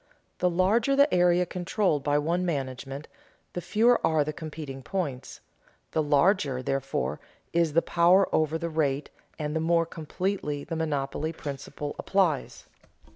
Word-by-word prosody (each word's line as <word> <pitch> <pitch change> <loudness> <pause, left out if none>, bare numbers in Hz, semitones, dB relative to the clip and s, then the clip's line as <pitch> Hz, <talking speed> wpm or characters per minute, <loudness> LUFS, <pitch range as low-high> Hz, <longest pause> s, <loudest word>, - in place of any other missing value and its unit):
The 180 - +3
larger 210 +9 +2
the 280 +2 +4
area 180 0 +4
controlled 180 -3 0
by 145 0 +2
one 170 +5 0
management, 135 -3 -4 0.5
the 175 - -3
fewer 230 +8 +3
are 155 -2 +3
the 155 +1 -4
competing 150 -4 -7
points; 140 -6 -4 0.5
the 160 - +1
larger, 145 -3 +2
therefore, 135 +1 -2 0.3
is 170 -3 +2
the 165 - +3
power 175 +3 +4
over 155 0 +2
the 170 +1 -3
rate 145 -2 0 0.3
and 150 0 -3
the - - +1
more 165 +1 +2
completely 165 -2 -3
the 165 - -5
monopoly 155 0 -2
principle 145 0 -6
applies. 185 -8 0
160 Hz, 140 wpm, -27 LUFS, 145-180 Hz, 0.5 s, the